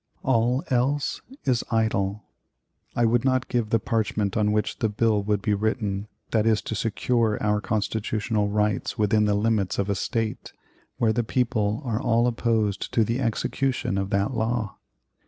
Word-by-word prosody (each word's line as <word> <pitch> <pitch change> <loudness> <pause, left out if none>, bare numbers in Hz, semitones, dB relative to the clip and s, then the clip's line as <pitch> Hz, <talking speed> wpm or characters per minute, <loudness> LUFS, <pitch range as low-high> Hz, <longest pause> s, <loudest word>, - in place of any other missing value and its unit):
All 125 +2 +2
else 135 +3 +1 0.2
is 125 -4 +1
idle. 105 -2 0 0.7
I 120 - +3
would 115 +1 +2
not 130 -1 +1
give 120 -3 0
the 115 - +3
parchment 105 -3 -1
on 105 -2 +2
which 105 -1 -1
the 110 - +1
bill 105 0 +2
would 100 -1 -1
be 105 - +2
written 105 -1 -1 0.2
that 110 -1 +2
is 110 -1 +4
to - - -4
secure 115 0 +1
our 105 -1 +1
constitutional 110 0 -1
rights 105 -1 0
within 105 0 +3
the 105 -1 +2
limits 105 -3 +1
of 100 0 0
a - - 0
State, 115 +2 -3 0.4
where 110 -2 +2
the 120 - 0
people 115 -1 0
are 115 -2 -1
all 120 0 +2
opposed 115 -4 0
to 115 - +5
the 115 +4 -1
execution 120 -2 -1
of 95 0 -2
that 100 +1 0
law. 110 -1 -1
110 Hz, 165 wpm, -25 LUFS, 105-120 Hz, 0.7 s, to